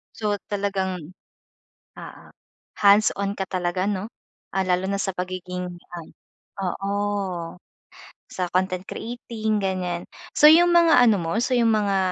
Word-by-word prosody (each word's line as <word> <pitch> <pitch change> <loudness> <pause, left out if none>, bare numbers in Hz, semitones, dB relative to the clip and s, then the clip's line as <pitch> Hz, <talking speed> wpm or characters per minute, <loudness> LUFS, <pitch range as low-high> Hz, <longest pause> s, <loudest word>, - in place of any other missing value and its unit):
So, 210 -2 -1 0.2
talagang 190 -4 -3 0.8
oo - - -11 0.5
hands-on 200 -1 +3
ka 190 - -2
talaga 180 0 -1
'no. 205 +1 -3 0.4
Ah, 195 - 0
lalo 180 0 0
na 200 - 0
sa 195 -1 -1
pagiging 180 0 -4 0.3
ay, 165 - -8 0.5
oo 195 +1 -3 1.4
sa 180 -1 -4
content 185 0 0
creating, 220 -2 -3
ganyan. 180 -2 -2 0.3
So, 300 - +7
yung 345 +2 +5
mga 335 -6 +6
ano 230 -4 +5
mo, 170 +6 -1
so 250 +1 0
yung 230 -2 +3
mga 205 -2 +1
195 Hz, 130 wpm, -23 LUFS, 185-215 Hz, 1.4 s, So